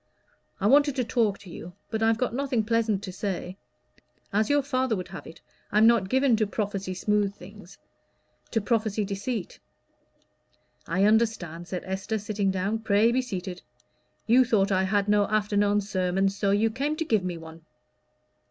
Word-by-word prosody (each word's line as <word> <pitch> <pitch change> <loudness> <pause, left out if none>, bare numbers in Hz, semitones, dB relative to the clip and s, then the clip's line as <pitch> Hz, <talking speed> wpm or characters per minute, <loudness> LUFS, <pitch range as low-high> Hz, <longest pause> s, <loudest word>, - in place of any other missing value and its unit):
I 195 - -2
wanted 285 +4 +5
to 255 - 0
talk 225 -4 +1
to 190 - -14
you, 175 +1 -9 0.2
but 220 -1 -2
I've 225 0 +3
got 250 -1 -1
nothing 255 -3 0
pleasant 220 -3 0
to 185 - -5
say. 185 -1 -4 0.8
As 215 +1 +2
your 290 -1 +3
father 260 -4 0
would 180 -2 -6
have - - -9
it, 160 - -13 0.3
I'm 210 +2 +5
not 225 -5 +4
given 265 0 +3
to 215 -1 +1
prophesy 200 -3 -3
smooth 205 +1 0
things 195 0 -13 0.7
to 225 - 0
prophesy 215 -1 0
deceit." 200 +1 -4 1.3
"I 185 +4 +1
understand," 205 -6 +1
said 180 -1 -4
Esther, 190 +3 -3
sitting 205 -1 -1
down. 190 +4 -1
"Pray 220 +1 +3
be 255 +2 +2
seated. 185 -6 -6 0.6
You 245 +4 +5
thought 210 -4 +1
I 190 0 +2
had 200 +1 +1
no 205 0 +3
afternoon 205 -1 +1
sermon, 190 -1 0
so 200 +1 -1
you 210 +3 +2
came 280 +6 -1
to 325 - -3
give 220 -9 +1
me 180 -2 -3
one." 160 0 -11
205 Hz, 170 wpm, -26 LUFS, 190-225 Hz, 1.3 s, wanted